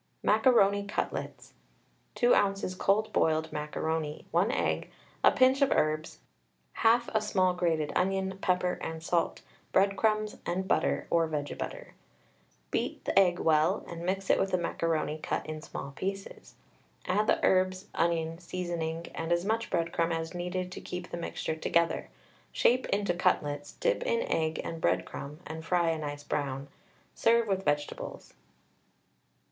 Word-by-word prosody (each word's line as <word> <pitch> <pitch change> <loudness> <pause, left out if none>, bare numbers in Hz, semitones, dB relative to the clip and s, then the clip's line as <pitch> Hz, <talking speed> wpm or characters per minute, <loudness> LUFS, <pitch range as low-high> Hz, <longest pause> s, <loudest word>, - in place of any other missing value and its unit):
MACARONI 205 -3 +4
CUTLETS. - - -4 0.6
2 245 0 +4
oz. 195 -2 +1
cold 215 +2 +2
boiled 160 -1 +1
macaroni, 150 0 -3
1 180 +7 +3
egg, - - -1 0.3
a - - +9
pinch 260 +1 +4
of 275 - +5
herbs, 155 +1 0 0.6
halt 230 +1 +4
a 220 - +3
small 185 -3 +2
grated 165 -4 0
onion, 190 +1 0
pepper 180 0 +1
and 160 0 -5
salt, 170 0 0 0.3
breadcrumbs, 215 +2 +2
and 190 +2 -2
butter, - - +1
or 165 -1 +3
vege 150 -2 -3
butter. - - -6 0.8
Beat - - -2
the - - +4
egg 180 -2 +4
well, 155 -2 +2
and 170 -1 -7
mix 190 +2 0
it - - +3
with 195 - +1
the 185 - +2
macaroni 165 -2 -1
cut - - -2
in 155 0 -6
small 140 -2 -7
pieces. 195 +7 -6 0.5
Add 210 +4 +1
the - - +3
herbs, 185 0 +2
onion, 165 -1 0
seasoning, 170 -2 -3
and 165 +1 -4
as 170 +1 +2
much 225 +2 0
breadcrumb 170 0 0
as 165 0 -3
needed 180 +1 -3
to - - -7
keep 180 0 -6
the - - -3
mixture 165 -1 -3
together. 170 +1 +1 0.4
Shape 255 +2 +3
into 200 -3 +1
cutlets, 145 -4 0
dip - - 0
in 485 -2 +1
egg 160 - -1
and 165 -1 -5
breadcrumb, 150 +4 -2
and 160 +1 -6
fry 170 0 +2
a 160 - -2
nice 145 -1 -5
brown. 140 -1 -3 0.4
Serve 230 0 +3
with 195 -1 0
vegetables. 145 -2 -3
175 Hz, 150 wpm, -30 LUFS, 160-195 Hz, 0.8 s, a